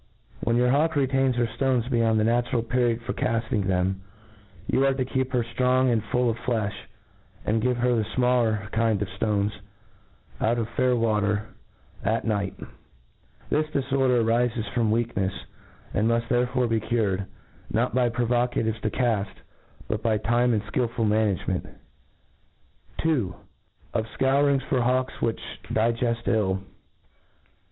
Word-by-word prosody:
When 115 - +1
your 125 +1 +3
hawk 155 +4 +2
retains 135 -2 +2
her 120 0 +2
ftones 120 +1 0
beyond 115 -2 +3
the - - +2
natural 120 +1 +1
pferiod 120 0 +1
for 125 - -3
cafting 115 -5 -1
them^ 95 +1 +1 0.7
you 135 - +2
arc 135 -1 +2
to 130 - 0
keep 130 0 -1
her 125 -2 +1
ftrong 125 +2 +2
and 110 -2 0
full 125 +3 +1
of 115 0 -1
flelh, 110 -4 -1 0.7
and 110 +1 +1
give 125 +1 +1
her 125 0 +2
the 110 -2 +1
fmaller 115 -5 +1
kind 110 -2 +1
of - - -5
ftones, 105 -1 0 0.9
out 115 +2 +2
of 115 - 0
faiir 125 +1 +1
water, 105 -2 +1 0.6
at 110 +3 0
night* 100 -3 -1 1.0
This 155 +1 +2
diforder 135 -4 +1
arifes 115 0 0
from 115 -3 +1
weakhelsj 105 - 0 0.5
and 105 +3 +2
miift 115 0 0
therefore 125 +1 +1
be 115 -1 +1
cured, 100 -4 -1 0.4
not - - +1
by 125 -1 +3
provocatives 120 -2 0
to 110 - 0
caft, 110 -5 -1 0.4
but 110 0 -2
by 110 -1 +2
time 120 +3 +2
and 105 - -1
ikiUful 115 -1 -1
management: 105 -4 0 1.3
2. 125 - 0 0.6
Of 110 0 -1
Scour 140 +2 +3
ings 135 -1 +1
for 130 -3 0
Hawks 125 +1 0
which 115 -1 0 0.3
digeft 115 +1 0
ill. 95 -3 +1
115 Hz, 145 wpm, -25 LUFS, 110-125 Hz, 1.3 s, your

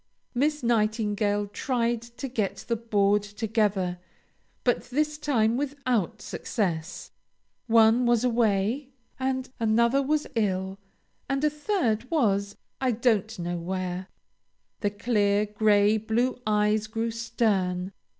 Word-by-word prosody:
Miss 295 +3 0
Nightingale 210 -2 +1
tried 235 +2 -1
to 235 +4 -7
get 220 -6 -3
the 235 - +1
board 210 -2 +2
together, 205 -3 -1 0.6
but 245 - +1
this 300 +4 -1
time 235 -6 +2
without 265 - -1
success. 180 -5 -3 0.6
One 230 +1 +5
was 240 -1 +3
away, 235 +2 +1 0.3
and 260 0 -1
another 235 +4 +3
was 300 +2 0
ill, 190 -3 -1 0.5
and 275 +1 0
a 300 - +3
third 295 - -1
was 200 -9 +1 0.3
I 260 - +2
don't 225 -2 +1
know 175 0 -3
where. 185 +1 -3 0.7
The 205 - +1
clear 205 -1 +1
gray 210 0 +3
blue 235 +4 -1
eyes 210 0 +2
grew 225 +1 -2
stern. 200 -6 0
220 Hz, 115 wpm, -27 LUFS, 205-245 Hz, 0.7 s, One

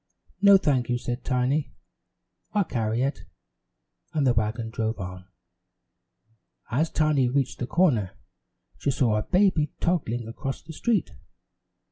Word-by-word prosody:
"No, 200 -1 +8
thank 135 -9 +1
you," 120 - +1
said 120 +1 -4
Tiny, 130 +2 0 0.8
"I'll 205 - +3
carry 115 -5 -1
it," 140 +2 -1 0.9
and 150 -3 +1
the 125 - +4
wagon 110 +1 -1
drove 110 0 -2
on. 90 -1 -7 1.5
As 155 +7 +1
Tiny 150 -5 +2
reached 135 0 -1
the 125 - -3
corner, 130 - +2 0.6
she - - -1
saw 125 -5 +2
a - - 0
baby 180 - +2
toddling 120 -10 -1
across 135 +4 -5
the 160 - -10
street. 215 +2 0
130 Hz, 130 wpm, -26 LUFS, 115-155 Hz, 1.5 s, No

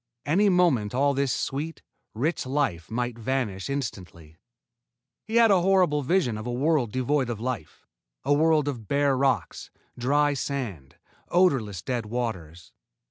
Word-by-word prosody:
Any 195 +8 +3
moment 145 - +2
all 140 +2 +3
this 140 -1 0
sweet, 150 +6 -3 0.3
rich 140 +4 -1
life 130 - -1
might 120 +1 -3
vanish 115 -5 -2
instantly. 90 - -6 0.9
He 220 - -4
had 230 -2 +6
a 190 -3 +4
horrible 180 -5 +3
vision 135 - +1
of 110 - -6
a - - -2
world 135 -2 +1
devoid 130 +1 0
of 115 -3 -4
life, 120 -9 -5 0.4
a 145 - +2
world 155 0 +3
of 120 -7 -4
bare 140 -1 +2
rocks, 130 -6 -1 0.3
dry 145 +4 +2
sand, 120 - -4 0.3
odorless, 130 - +2
dead 120 -4 -3
waters. 90 -9 -5
130 Hz, 140 wpm, -26 LUFS, 110-145 Hz, 0.9 s, had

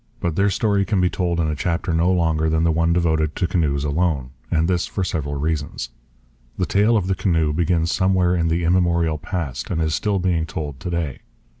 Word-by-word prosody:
But 85 -3 -2
their 100 +3 +3
story 100 0 +1
can 100 -1 0
be 90 -1 +2
told 85 -2 -1
in 80 - +1
a 75 - 0
chapter 85 +2 -1
no 85 +3 +2
longer 80 -3 +1
than 80 +1 +1
the 85 - +3
one 85 +1 +1
devoted 80 -3 +1
to 90 - 0
canoes 75 -6 0
alone; 75 -4 0 0.2
and 80 0 +1
this 90 -1 0
for 95 - -3
several 75 -5 -2
reasons. 75 -4 -3 0.7
The 90 - +1
tale 105 +5 +3
of 100 - 0
the 95 - +1
canoe 80 -5 +1
begins 85 0 +1
somewhere 95 -1 +2
in 85 -2 +1
the 85 +1 0
immemorial 85 -2 +2
past 75 -9 -4
and 80 - -1
is 80 -1 0
still 100 +4 0
being 90 -3 0
told 75 -4 -5
to - - -5
day. 85 -6 -2
85 Hz, 210 wpm, -21 LUFS, 80-90 Hz, 0.7 s, their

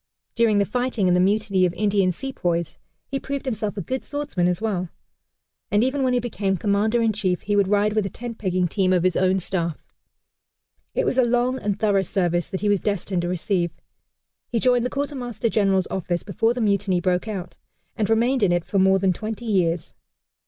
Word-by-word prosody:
During 230 -3 +3
the 200 - +3
fighting 245 -4 0
in 180 - +4
the 180 - +3
mutiny 195 0 +2
of 180 -1 +1
Indian 200 -3 +2
sepoys, 175 - -3 0.3
he 275 - -3
proved 280 +1 -4
himself 215 -4 -3
a - - -1
good 260 +10 -3
swordsman 285 -12 -1
as 180 -1 0
well; 190 -5 -2 0.8
and 210 +2 +3
even 265 +2 0
when 255 -1 +2
he 250 - +3
became 205 -5 -1
Commander 215 +5 +1
in 225 -1 +2
chief, 185 -4 -1
he 205 0 -1
would 200 -1 +3
ride 205 +1 +2
with 215 -2 +1
a - - -5
tent 230 +3 -8
pegging 185 -2 0
team 185 +1 +1
of 180 -2 +2
his 185 -1 +2
own 185 0 +2
staff. 170 -3 -2 1.2
It - - +1
was 260 - +1
a - - +6
long 245 +2 +1
and 205 -1 -2
thorough 205 -3 +3
service 175 -2 0
that 190 - -5
he 210 - 0
was 205 -1 +3
destined 195 -2 -1
to 175 - -2
receive. 180 0 0 0.8
He 235 - -1
joined 245 0 +3
the - - -7
Quartermaster 255 -6 -3
General's 195 -4 +2
office 175 -2 -2
before 225 +4 0
the 245 - -2
mutiny 200 -3 +1
broke 180 +3 0
out, 190 -5 -5 0.4
and 215 -3 -1
remained 240 +3 +2
in 195 -4 +3
it 175 -1 0
for 200 - 0
more 190 0 +5
than 190 -1 +2
twenty 220 +5 -6
years. 175 -6 0
205 Hz, 205 wpm, -23 LUFS, 185-230 Hz, 1.2 s, a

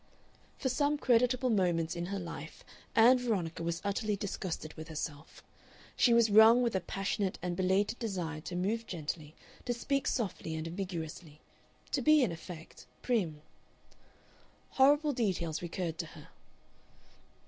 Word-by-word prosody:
For 270 - -2
some 285 +3 +1
creditable 250 0 +2
moments 175 -5 +1
in 170 0 -3
her 200 +1 -3
life 165 -4 -8 0.3
Ann 245 +3 +7
Veronica 190 -10 -2
was 170 +1 -3
utterly 210 +1 0
disgusted 185 -5 -4
with 160 0 -9
herself; 155 -1 -6 0.5
she 245 - +4
was 235 -2 +5
wrung 220 +4 +8
with 235 -4 0
a - - +3
passionate 195 +1 -2
and 180 -1 -2
belated 190 +5 +1
desire 175 -8 -3
to 175 - -6
move 215 +6 -1
gently, 155 -2 -5 0.3
to 245 -1 -1
speak 275 +3 -1
softly 190 -8 -2
and 160 0 -4
ambiguously 165 -3 -6 0.5
to - - 0
be, 305 -2 +5
in 220 - +1
effect, 165 0 -10 0.2
prim. 175 -12 0 1.3
Horrible 290 +2 +4
details 185 - -1
recurred 170 -1 -4
to 165 - -3
her. 155 -2 -13
190 Hz, 140 wpm, -32 LUFS, 165-235 Hz, 1.3 s, wrung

